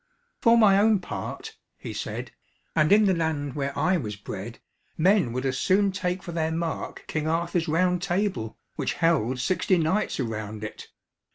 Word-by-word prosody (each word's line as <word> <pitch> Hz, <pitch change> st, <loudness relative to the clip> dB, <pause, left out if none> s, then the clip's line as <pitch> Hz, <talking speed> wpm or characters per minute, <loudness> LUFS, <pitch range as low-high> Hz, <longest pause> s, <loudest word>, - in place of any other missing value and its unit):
"For 230 Hz, -1 st, +6 dB
my 200 Hz, -4 st, +6 dB
own 215 Hz, +1 st, +5 dB
part," 440 Hz, -, -6 dB, 0.2 s
he -, -, -7 dB
said, -, -, -5 dB, 0.4 s
"and 155 Hz, +1 st, +3 dB
in 210 Hz, +1 st, +6 dB
the 190 Hz, -, +4 dB
land 155 Hz, -5 st, -1 dB
where 140 Hz, 0 st, -3 dB
I 180 Hz, +5 st, +2 dB
was 105 Hz, -9 st, -4 dB
bred, 105 Hz, +2 st, -7 dB, 0.4 s
men 180 Hz, -, +3 dB
would 130 Hz, +2 st, -3 dB
as 130 Hz, -1 st, -1 dB
soon 200 Hz, +1 st, +3 dB
take 180 Hz, -1 st, -2 dB
for 175 Hz, -, -6 dB
their 160 Hz, -1 st, -1 dB
mark 165 Hz, 0 st, -3 dB
King 155 Hz, 0 st, -2 dB
Arthur's 170 Hz, +1 st, 0 dB
round 180 Hz, +3 st, +2 dB
table, 180 Hz, -, -1 dB, 0.2 s
which -, -, -1 dB
held 150 Hz, -8 st, +1 dB
sixty 180 Hz, +6 st, +1 dB
knights 170 Hz, +4 st, 0 dB
around 110 Hz, -3 st, -4 dB
it. 105 Hz, -, -7 dB
165 Hz, 170 wpm, -26 LUFS, 135-185 Hz, 0.4 s, For